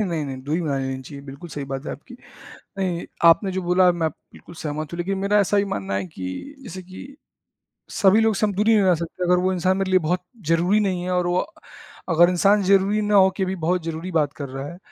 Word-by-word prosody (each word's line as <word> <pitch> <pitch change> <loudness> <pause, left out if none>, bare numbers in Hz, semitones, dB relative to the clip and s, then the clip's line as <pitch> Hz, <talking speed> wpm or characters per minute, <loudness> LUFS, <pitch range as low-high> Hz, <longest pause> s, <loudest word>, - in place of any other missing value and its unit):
अ, 215 - +2
नहीं, 165 -5 -2
नहीं, 135 -1 -5
दूरी 155 +5 -1
बना 145 -3 -1
लेनी 130 0 -4
चाहिए, 140 +1 -10
बिल्कुल 140 +5 -10
सही 145 -2 -5
बात 135 +2 -5
है - - -3
आपकी। 245 +11 -12 0.6
नहीं, 180 -3 -2 0.2
आपने 185 +4 +5
जो 190 0 -2
बोला 180 +1 +4
मैं 165 -2 -1 0.2
बिल्कुल 170 - -14
सहमत 155 0 -5
हूँ - - -5
लेकिन 190 +3 -2
मेरा 200 +2 +2
ऐसा 205 +1 +2
भी 200 - +2
मानना 100 0 -4
है 100 -1 -1
कि 95 - -7
जैसे 185 -4 -8
कि 190 +10 -11 0.8
सभी 200 +2 +4
लोगों 220 0 +3
से 215 - +1
हम 205 - -1
दूरी 215 +3 +3
नहीं 210 - +4
बना 185 -1 +4
सकते। 170 +2 -5
अगर 180 0 +3
वो 190 - +2
इंसान 185 +2 +1
मेरे 195 -1 -1
लिए 185 - +5
बहुत 180 +3 -1 0.2
ज़रूरी 175 +5 +3
नहीं 185 -4 -1
है 185 - -3
और 180 -1 +1
वो 175 +1 +1 0.7
अगर 170 +2 +5
इंसान 195 +3 +3
ज़रूरी 200 +2 +3
ना 210 0 +1
होके 190 -1 +4
भी 190 +1 -3
बहुत 180 +1 +1
ज़रूरी 165 +3 -5
बात 150 -4 +1
कर 140 -2 -7
रहा 135 +2 -6
है 175 - -9
180 Hz, 240 wpm, -22 LUFS, 155-195 Hz, 0.8 s, आपने